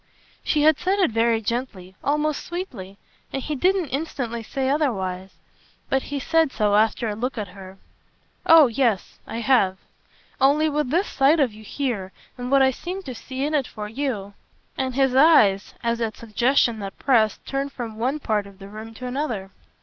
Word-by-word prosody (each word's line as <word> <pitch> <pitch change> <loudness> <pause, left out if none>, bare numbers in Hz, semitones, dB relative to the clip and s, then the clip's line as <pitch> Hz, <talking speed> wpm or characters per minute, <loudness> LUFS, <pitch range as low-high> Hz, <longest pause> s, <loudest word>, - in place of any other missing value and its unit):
She 300 -2 +1
had 310 -1 +5
said 375 +2 +1
it 370 - +2
very 225 0 +2
gently, 210 -5 -4
almost 300 +1 0
sweetly, 245 - -7 0.3
and 270 - -2
he 300 +3 -4
didn't 360 +2 +1
instantly 250 -5 -3
say 265 +4 -3
otherwise. 195 -10 -1 0.5
But 270 - +2
he 285 - -2
said 325 +1 +2
so 210 -4 +1
after 220 +2 +2
a 210 - -1
look 250 +4 -3
at 205 -3 -4
her. 190 0 -12 0.7
"Oh 325 -4 +8
yes 235 -5 0
I 230 - -4
have. 225 -7 +3 0.6
Only 290 +4 +4
with 295 -3 -1
this 350 +8 +2
sight 280 +1 +3
of 260 -7 +2
you 215 +1 -13
here 215 -6 -3 0.2
and 245 0 -5
what 275 0 +5
I 265 - +4
seem 365 +8 -6
to 260 - -6
see 260 +3 -5
in 300 - -2
it 280 -4 +1
for 210 -1 -7
you 220 -4 -3 0.2
!" - - -40
And 260 -1 -2
his 265 -1 +2
eyes, 260 -9 +5
as 235 0 0
at 225 -1 -2
suggestions 235 +1 +1
that 195 -1 -7
pressed, 225 -6 +2
turned 275 +1 -2
from 230 -4 -6
one 255 +6 0
part 215 -6 -1
of 200 -1 -15
the 195 0 -11
room 220 +2 -9
to 255 - -8
another. 245 -7 -3
250 Hz, 190 wpm, -23 LUFS, 215-285 Hz, 0.7 s, Oh